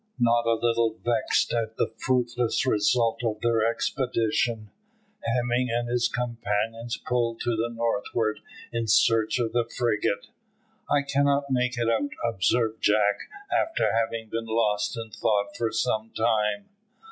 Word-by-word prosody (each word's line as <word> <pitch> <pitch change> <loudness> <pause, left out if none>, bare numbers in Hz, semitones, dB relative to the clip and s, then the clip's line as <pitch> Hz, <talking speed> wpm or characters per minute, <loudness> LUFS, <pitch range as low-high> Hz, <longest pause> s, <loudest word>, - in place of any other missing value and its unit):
Not 120 -1 +2
a 115 - +4
little 115 -1 +1
vexed 120 -2 +1
at 115 -1 -2
the - - -1
fruitless 125 -1 0
result 115 0 +2
of 110 -2 -1
their 115 -2 +2
expedition, 115 -2 0 0.5
Hemming 125 -3 0
and 120 +1 -1
his 120 0 +2
companions 115 0 -2
pulled 120 -2 -1
to 120 - 0
the 115 +2 -1
northward 115 -1 -1 0.3
in 115 -1 -1
search 115 +1 +3
of 115 -2 -1
the 120 -1 0
frigate. 105 -4 0 0.6
"I 145 -1 +3
cannot 140 0 +1
make 125 -1 +1
it 120 -1 0
out," 115 +5 +1 0.2
observed 110 +1 +1
Jack, 105 -1 +2 0.2
after 330 0 +1
having 115 0 -1
been 115 +1 -3
lost 105 0 0
in 115 -1 -6
thought 100 -1 0
for 115 -1 -1
some 115 -1 -1
time. 105 -3 +1
115 Hz, 140 wpm, -26 LUFS, 110-120 Hz, 0.6 s, a